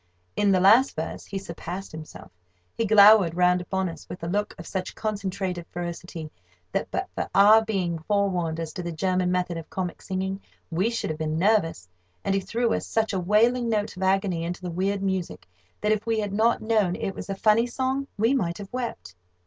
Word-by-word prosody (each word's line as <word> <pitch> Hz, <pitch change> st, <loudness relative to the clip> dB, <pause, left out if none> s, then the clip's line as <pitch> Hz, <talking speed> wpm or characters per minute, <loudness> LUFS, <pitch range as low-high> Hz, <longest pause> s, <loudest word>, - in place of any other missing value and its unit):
In 205 Hz, -, +2 dB
the 190 Hz, -1 st, +4 dB
last 225 Hz, +9 st, +5 dB
verse, 160 Hz, +1 st, -5 dB
he 200 Hz, -, -4 dB
surpassed 185 Hz, +1 st, -6 dB
himself. 155 Hz, -, -10 dB, 0.4 s
He 230 Hz, -, 0 dB
glowered 205 Hz, -4 st, +7 dB
round 180 Hz, 0 st, +3 dB
upon 190 Hz, +1 st, -1 dB
us 165 Hz, -3 st, -9 dB
with 175 Hz, -, -8 dB
a -, -, -2 dB
look 205 Hz, +4 st, -1 dB
of -, -, -9 dB
such 185 Hz, -1 st, -4 dB
concentrated 190 Hz, -4 st, -3 dB
ferocity 170 Hz, -2 st, -6 dB, 0.4 s
that, -, -, -2 dB
but -, -, -2 dB
for -, -, -3 dB
our 215 Hz, +3 st, +7 dB
being 185 Hz, -6 st, -1 dB
forewarned 180 Hz, -2 st, 0 dB
as 165 Hz, -1 st, -4 dB
to 185 Hz, -, -5 dB
the 170 Hz, -1 st, -4 dB
German 180 Hz, +2 st, 0 dB
method 180 Hz, -1 st, -1 dB
of 165 Hz, -, -8 dB
comic 180 Hz, -2 st, -4 dB
singing, 190 Hz, +1 st, -3 dB, 0.3 s
we 185 Hz, +7 st, +1 dB
should 230 Hz, -8 st, -2 dB
have 155 Hz, -, -6 dB
been 155 Hz, 0 st, -1 dB
nervous; 175 Hz, -, +1 dB, 0.4 s
and 195 Hz, -, 0 dB
he 195 Hz, -, +1 dB
threw 230 Hz, +5 st, 0 dB
such 220 Hz, -1 st, -1 dB
a 190 Hz, -, 0 dB
wailing 230 Hz, +6 st, +3 dB
note 210 Hz, -3 st, -1 dB
of 185 Hz, -, -9 dB
agony 190 Hz, -3 st, +1 dB
into 175 Hz, +2 st, -5 dB
the 180 Hz, -, -3 dB
weird 195 Hz, +3 st, -1 dB
music 190 Hz, -, -3 dB, 0.3 s
that, 210 Hz, -, +1 dB
if 215 Hz, -1 st, +1 dB
we 225 Hz, -1 st, +1 dB
had 205 Hz, -2 st, -3 dB
not 225 Hz, +3 st, +2 dB
known 215 Hz, -5 st, +2 dB
it 195 Hz, -, -3 dB
was -, -, -8 dB
a 195 Hz, -, -2 dB
funny 215 Hz, +4 st, +3 dB
song, 260 Hz, +2 st, -2 dB
we 225 Hz, +5 st, +3 dB
might 175 Hz, -10 st, 0 dB
have 200 Hz, +1 st, -10 dB
wept. 230 Hz, -, -5 dB
190 Hz, 205 wpm, -25 LUFS, 175-215 Hz, 0.4 s, glowered